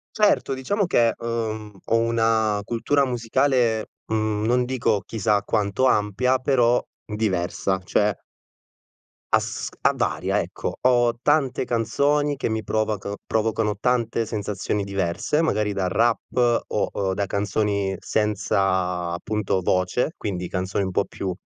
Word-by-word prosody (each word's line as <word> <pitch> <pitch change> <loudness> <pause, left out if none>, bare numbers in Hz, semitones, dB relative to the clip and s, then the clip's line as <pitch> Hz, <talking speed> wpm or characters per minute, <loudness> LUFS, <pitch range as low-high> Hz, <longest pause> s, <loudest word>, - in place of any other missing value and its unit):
Certo 210 -10 +2
diciamo 200 +10 -1
che, 115 -9 +3
uhm, 110 -2 -3
ho 115 - +2
una 115 -2 +2
cultura 135 +5 +1
musicale, 120 -1 +1 0.2
mhmm, 110 -1 -1
non 125 +2 +2
dico 115 -5 0
chissà 105 -2 +1
quanto 105 +3 0
ampia, 125 +3 +2
però 125 -3 +3 0.3
diversa, 95 -2 0
cioè 105 +2 +1 1.1
Asc - - -1
a - - +4
varia, - - 0
ecco. - - -4
Ho 120 -2 +4
tante 140 -4 +2
canzoni 145 +5 +1
che 135 - -2
mi 110 0 -2
provac 110 -2 -1
provocano 110 -1 0
tante 115 -1 0
sensazioni 105 -1 -2
diverse 100 - -1
magari 110 -10 +1
da 100 -2 -1
rap 120 +4 +1
o 95 -1 -1
da 100 +1 -1
canzoni 100 0 0
senza 95 -4 0
appunto 95 +1 -1
voce, 95 - 0
quindi 90 -3 -4
canzoni 95 +2 -2
un 95 - -3
po' 100 +2 +1
più 95 0 -4
110 Hz, 125 wpm, -23 LUFS, 100-120 Hz, 1.1 s, a